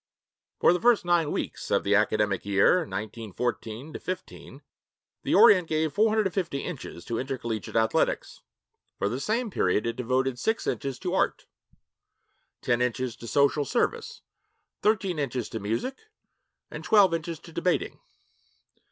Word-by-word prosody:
For - - +5
the 180 - -2
first 235 -5 +4
nine 170 -3 +2
weeks - - -4
of - - +2
the 100 - +1
academic 105 -2 +2
year 100 - +4
1914 115 - -4
15, 185 0 -7 0.6
the - - 0
Orient 185 - +7
gave 155 -1 0
450 200 -7 +1
inches 140 - -7
to 115 - -3
intercollegiate 120 -6 -4
athletics. 110 0 0 0.6
For - - 0
the 120 +5 -2
same 225 - -1
period, 100 - +1
it 115 0 -2
devoted 130 +1 -1
six 220 - -1
inches 135 -3 -2
to 180 -1 -4
art, - - 0 1.2
ten 120 0 +1
inches 125 0 -1
to 115 - -10
social 140 +3 +2
service, 445 - -2 0.6
thirteen 195 -6 +1
inches 130 -4 -2
to 115 - -5
music, 115 - -3 0.7
and - - -7
twelve 200 -5 +5
inches 165 0 -3
to 165 - -14
debating. 180 +2 -1
140 Hz, 135 wpm, -27 LUFS, 115-180 Hz, 1.2 s, Orient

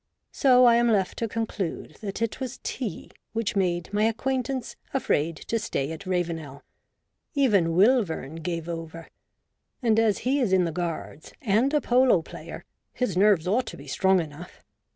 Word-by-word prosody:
So 255 -2 +5
I 235 -1 +6
am 240 0 +3
left 195 -4 +1
to 230 - -1
conclude 200 -8 -4
that 205 +1 -3
it 230 - -3
was 260 -1 -5
tea 230 -10 -5 0.2
which 225 -2 -1
made 180 -1 0
my 210 +1 +2
acquaintance 255 +3 -2 0.2
afraid 165 - +1
to 230 - -2
stay 145 -9 -2
at 185 +4 -8
Ravenel. 165 -6 -3 0.7
Even 200 -12 +3
Wilvern 185 - +2
gave 165 0 -3
over; 165 -1 -7 0.7
and 225 -4 +2
as 220 -3 +3
he 270 +3 +2
is 230 -8 +1
in 185 -2 +4
the 165 - -2
Guards, 165 -2 -5
and 235 +2 +2
a 300 -1 +2
polo 245 -8 +4
player, - - -9 0.3
his 250 -8 -1
nerves 190 -3 +4
ought 230 +5 +1
to - - -7
be - - -11
strong 190 -1 +2
enough. 165 +2 -8
200 Hz, 165 wpm, -26 LUFS, 170-235 Hz, 0.7 s, I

